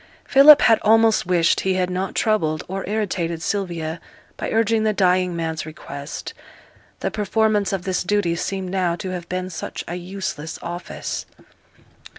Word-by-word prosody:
Philip 285 +2 +8
had 225 -2 +5
almost 225 -2 +4
wished 175 -2 +3
he 190 -1 0
had 185 -1 0
not 185 +1 -3
troubled 160 -8 +1
or 190 +1 -4
irritated 180 -6 -1
Sylvia 170 -5 -3 0.3
by - - -4
urging 225 0 +2
the 215 -1 +2
dying 180 -2 +2
man's 160 -1 -3
request: 150 -1 -8 0.7
the - - -1
performance 210 -1 +1
of 195 -2 -2
this 185 -1 -1
duty 195 -3 +1
seemed 185 +1 -3
now 180 -3 0
to 185 +2 -5
have 175 -2 -6
been 185 0 -3
such - - -6
a 170 - -4
useless 180 -3 -5
office. 175 +1 -5
185 Hz, 155 wpm, -22 LUFS, 170-205 Hz, 0.7 s, Philip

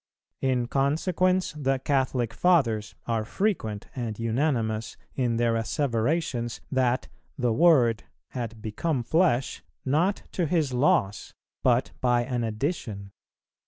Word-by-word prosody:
In 130 -2 +1
consequence 170 +8 +1
the 135 -2 0
Catholic 130 -3 0
Fathers 115 -10 +2
are 115 -2 0
frequent 110 - -2
and 115 -5 -4
unanimous 115 -2 -1 0.2
in 120 -3 0
their 115 0 +2
asseverations, 120 +1 -1
that 130 -2 +1 0.3
"the 125 -4 +1
Word" 130 -7 +4 0.2
had 115 -3 -6
become 125 +5 -1
flesh, 155 -3 +1 0.2
not 165 +9 +1
to 175 -3 -1
His 155 -5 +1
loss, 125 -6 +1 0.3
but 125 0 +2
by 120 -1 +3
an 120 -1 -2
addition. 110 - -3
125 Hz, 115 wpm, -26 LUFS, 115-150 Hz, 0.3 s, Word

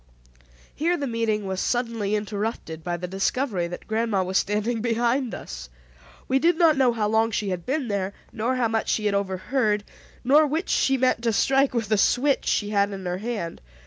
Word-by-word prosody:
Here 340 +3 0
the 285 - -2
meeting 225 -4 -1
was 190 -1 -2
suddenly 230 -4 -1
interrupted 205 -6 -4
by 175 -1 -2
the 180 +1 -5
discovery 195 0 -1
that 175 - -8
grandma 220 -3 0
was 185 +1 +1
standing 215 +3 -1
behind 240 +2 0
us. - - -8 0.6
We 265 +1 +2
did 335 +3 +3
not 330 -3 +5
know 260 -3 +4
how 220 -3 -1
long 220 +1 +2
she 210 -2 -2
had 180 -2 -4
been 270 0 -1
there 200 -2 -1 0.2
nor 235 +4 -1
how 250 -2 +1
much 225 0 -1
she 215 - 0
had 205 - +2
overheard, 205 +3 0 0.4
nor 295 +5 +5
which 315 +6 -2
she 270 0 +2
meant 255 -2 +2
to 235 -1 +1
strike 270 +4 +2
with 225 -3 -1
the 215 -2 +2
switch 275 +6 +2
she 205 0 +1
had 200 -1 +2
in 190 -1 -7
her 180 +1 -2
hand. 210 -6 -4
220 Hz, 195 wpm, -25 LUFS, 200-255 Hz, 0.6 s, not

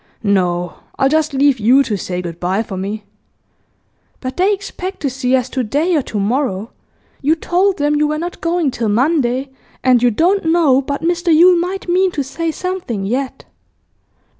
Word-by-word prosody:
No, 180 -4 0 0.2
I'll 270 - +3
just 310 +1 +1
leave 275 -2 +2
you 250 +6 +5
to 220 - -2
say 180 -2 -4
good 170 -1 -7
bye 190 +5 0
for 200 - -7
me.' 200 +3 -4 1.2
'But 255 -1 -5
they 375 +3 +2
expect 390 -1 -5
to 275 - -1
see 255 0 0
us 255 -1 0
to 260 -1 -2
day 300 +10 0
or 300 - +2
to 215 -4 -4
morrow. 220 -1 -1 0.5
You 300 +4 +2
told 365 +4 +1
them 295 +1 +1
you 300 0 +2
were 305 0 -1
not 345 +3 -5
going 335 -4 0
till 230 -3 -2
Monday, 260 +2 +1 0.3
and 255 -2 +4
you 245 - +4
don't 345 - +1
know 320 -5 +3
but 280 +2 -4
Mr 345 +1 +1
Yule 350 +3 +6
might 365 +3 -3
mean 370 +2 +3
to 285 - -1
say 325 +5 -3
something 320 - -4
yet. 255 +5 -3
275 Hz, 185 wpm, -17 LUFS, 230-335 Hz, 1.2 s, Yule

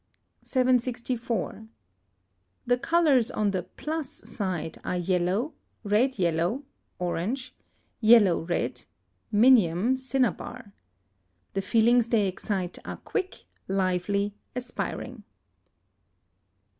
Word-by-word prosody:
764. 245 -4 0 1.0
The 245 0 +3
colours 300 -7 +3
on 210 -1 0
the 185 -2 -1
plus 300 - -5
side 185 -7 -4
are 180 - -2
yellow, 185 - 0 0.3
red 225 +5 +2
yellow 175 - 0 0.3
(orange), 210 +9 -2 0.5
yellow 215 -6 +6
red 170 +1 -2 0.5
(minium, 220 -1 +5
cinnabar). 250 -3 -2 0.8
The 195 - 0
feelings 230 +4 +3
they 215 -4 +3
excite 185 -1 -3
are - - -6
quick, 375 0 -4 0.2
lively, 195 +2 0 0.2
aspiring. 250 -1 -5
220 Hz, 85 wpm, -27 LUFS, 185-250 Hz, 1.0 s, yellow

